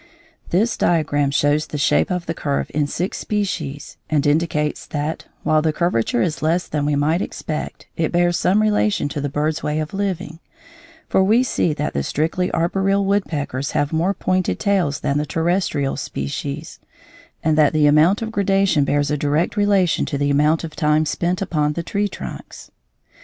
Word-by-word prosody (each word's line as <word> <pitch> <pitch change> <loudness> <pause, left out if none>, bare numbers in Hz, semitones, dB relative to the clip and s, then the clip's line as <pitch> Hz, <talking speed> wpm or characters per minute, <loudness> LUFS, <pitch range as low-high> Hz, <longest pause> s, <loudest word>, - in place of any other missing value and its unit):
This 220 +6 +1
diagram 145 -4 +1
shows 145 +2 +1
the 150 - -5
shape 145 - +2
of 180 -2 -2
the 165 - -2
curve 140 -4 -2
in 150 -1 +1
six 180 +6 -3
species, 175 -9 -3
and 155 -2 +1
indicates 150 0 0
that, 150 0 -3 0.2
while 155 0 +3
the 160 0 +1
curvature 150 -8 0
is 160 -2 -2
less 165 +3 +1
than 145 -1 -1
we 150 - +1
might 155 +5 +1
expect, 155 -1 -5
it 160 -2 -1
bears 175 0 +2
some 205 +5 +2
relation 210 -5 +1
to 145 - -4
the 145 - -2
bird's 150 +2 -1
way 150 +1 -1
of 155 +3 -4
living; 190 -5 -3 0.7
for 190 - +3
we 220 +6 +4
see 175 -9 0
that 150 - -2
the 70 - 0
strictly 165 - -1
arboreal 195 +4 +1
woodpeckers 145 -9 -1
have 145 +2 0
more 175 +5 +1
pointed 185 0 0
tails 180 -8 +1
than 140 +1 0
the 150 - -1
terrestrial 165 -4 0
species, 145 +2 -5 0.6
and 155 -1 +2
that 150 -1 +4
the 155 -1 +3
amount 155 +9 +4
of 220 - -4
gradation 195 -6 +2
bears 145 +1 +1
a 150 - +1
direct 150 +6 0
relation 200 -4 +2
to 140 - -2
the 145 0 +1
amount 150 +3 +2
of 160 -2 -7
time 155 -1 +2
spent 180 +4 -1
upon 150 -5 0
the 170 - -4
tree 205 +4 -1
trunks. - - -9
155 Hz, 180 wpm, -20 LUFS, 145-185 Hz, 0.7 s, we